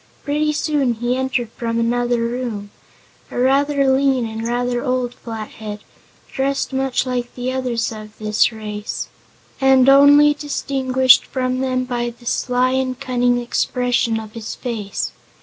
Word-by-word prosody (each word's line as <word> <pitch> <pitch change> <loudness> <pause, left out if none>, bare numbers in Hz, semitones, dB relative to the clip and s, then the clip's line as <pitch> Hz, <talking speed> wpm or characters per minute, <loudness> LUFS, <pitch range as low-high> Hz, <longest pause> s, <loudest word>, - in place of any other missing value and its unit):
Pretty 300 +1 0
soon 290 -5 0
he 240 +2 -1
entered 255 -3 -1
from 230 -1 -3
another 240 +1 +1
room 230 -4 -3 0.6
a - - -7
rather 275 +2 +2
lean 265 -2 +2
and 225 0 -4
rather 245 0 -1
old 255 -2 -1
Flathead, 215 -2 -7 0.5
dressed 275 0 -1
much 265 -1 0
like 250 -1 -3
the 250 +1 -2
others 245 -3 -1
of 215 -1 -10
this 215 0 -4
strange 220 -2 +3
race, 210 0 -4 0.5
and 265 -1 +5
only 285 +2 +7
distinguished 265 -3 +2
from 255 -1 -1
them 255 -1 0
by 240 -1 -2
the 240 +1 -15
sly 250 +1 +1
and 260 -1 -1
cunning 245 -2 +1
expression 245 -1 0
of 215 -1 -9
his 225 -2 -6
face. 215 -5 -4
250 Hz, 145 wpm, -20 LUFS, 230-265 Hz, 0.6 s, only